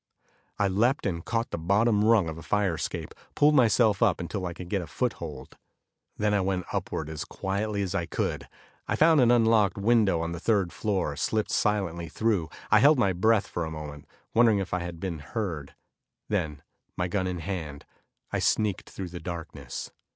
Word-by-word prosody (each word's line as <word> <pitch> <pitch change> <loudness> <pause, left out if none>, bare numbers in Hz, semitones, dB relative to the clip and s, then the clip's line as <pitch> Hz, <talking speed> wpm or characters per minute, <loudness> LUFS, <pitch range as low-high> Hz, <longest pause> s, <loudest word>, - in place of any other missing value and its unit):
I 100 - +2
leaped 115 +8 +1
and 85 -4 -2
caught 115 0 -2
the - - -3
bottom 105 +5 +2
rung 110 -5 +4
of 80 0 -5
a - - -9
fire 100 0 +1
escape, 80 -1 -4 0.2
pulled 150 +1 +5
myself 115 -5 +4
up 105 -7 +3
until 90 +2 -3
I 85 - -5
could 85 +1 -9
get 100 +1 -1
a 85 - -7
foothold. 80 - -4 0.6
Then 105 0 +1
I 100 - +3
went 95 -1 -1
upward 80 - -3
as 80 -1 -5
quietly 100 +1 -2
as 95 - -3
I 85 - -1
could. - - -2 0.4
I - - 0
found 160 -2 +5
an 120 - +5
unlocked 115 -3 +4
window 105 -4 +3
on 85 0 -2
the 85 - -5
third 100 -3 +1
floor, 95 -9 -1
slipped 110 +8 -1
silently 85 -6 0
through. 100 -4 0 0.2
I 105 - +7
held 145 +5 +6
my 100 -6 +2
breath 105 +3 +3
for 85 - -4
a 80 - -3
moment, 75 -2 -8 0.3
wondering 115 -2 +5
if 95 -2 -3
I 90 - +1
had 85 -1 -6
been 85 -3 -4
heard. 80 -3 -4 0.5
Then, 75 -3 -2 0.3
my 90 - 0
gun 95 +1 -1
in 90 - -2
my 85 - -6
hand, 80 -7 -5 0.5
I - - 0
sneaked 105 -4 0
through 95 -2 -6
the 85 0 -7
darkness. 85 -1 -6
95 Hz, 195 wpm, -27 LUFS, 85-110 Hz, 0.6 s, I